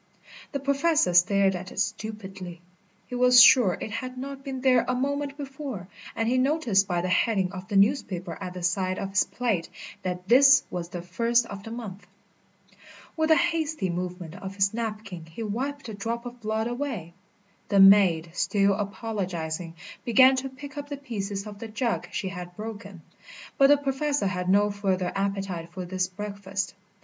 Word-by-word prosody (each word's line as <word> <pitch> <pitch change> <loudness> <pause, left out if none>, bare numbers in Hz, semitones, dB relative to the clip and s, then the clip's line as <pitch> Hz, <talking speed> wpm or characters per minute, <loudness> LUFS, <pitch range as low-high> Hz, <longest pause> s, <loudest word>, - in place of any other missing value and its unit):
The 280 - -2
Professor 280 - +2
stared 190 +2 +4
at 185 +1 -7
it - - -6
stupidly. 195 -5 -4 0.5
He - - -12
was 250 0 +6
sure 235 -6 +7
it 220 - -5
had 255 +4 -5
not 275 +1 -7
been 265 -2 -5
there 255 -2 +4
a 255 - 0
moment 280 +2 -2
before, 270 - -7 0.3
and 225 - 0
he 255 +2 +2
noticed 255 -9 +2
by 175 -2 0
the 180 - -2
heading 190 -1 +1
of 185 -1 -8
the 200 - -4
newspaper 195 - +1
at 185 -1 -6
the 180 - -6
side 185 +1 0
of 195 -1 -4
his 195 - +3
plate 225 -9 -2 0.3
that 180 0 -4
this 270 +4 +7
was 175 -1 -4
the 175 -1 -6
first 230 +6 +1
of 200 -3 -8
the 225 - -9
month. 220 -4 -8 1.1
With 315 0 0
a 320 - +7
hasty 315 - 0
movement 180 -1 -5
of 190 +1 -7
his 200 +1 +2
napkin 215 -7 -5
he 160 +8 -7
wiped 270 +7 -3
the 225 - -6
drop 230 +4 -4
of 245 0 -9
blood 220 +1 -1
away. 240 - -4 0.6
The 200 - +3
maid, 190 -4 +6
still 200 +2 +2
apologising, 190 -5 -4 0.3
began 260 +3 +6
to 270 +1 -3
pick 285 +3 -9
up 285 0 -8
the 285 - -4
pieces 205 -7 -4
of 205 -1 -9
the 230 - -6
jug 230 +2 -2
she 190 - -3
had 180 -1 -8
broken; 205 -5 -8 0.6
but 275 - +7
the 290 +1 +6
Professor 280 -1 -1
had 180 -1 -2
no 205 +2 +4
further 190 -3 -1
appetite 195 -4 -3
for 185 0 -6
his 185 0 -1
breakfast. 200 0 -5
205 Hz, 180 wpm, -26 LUFS, 185-255 Hz, 1.1 s, sure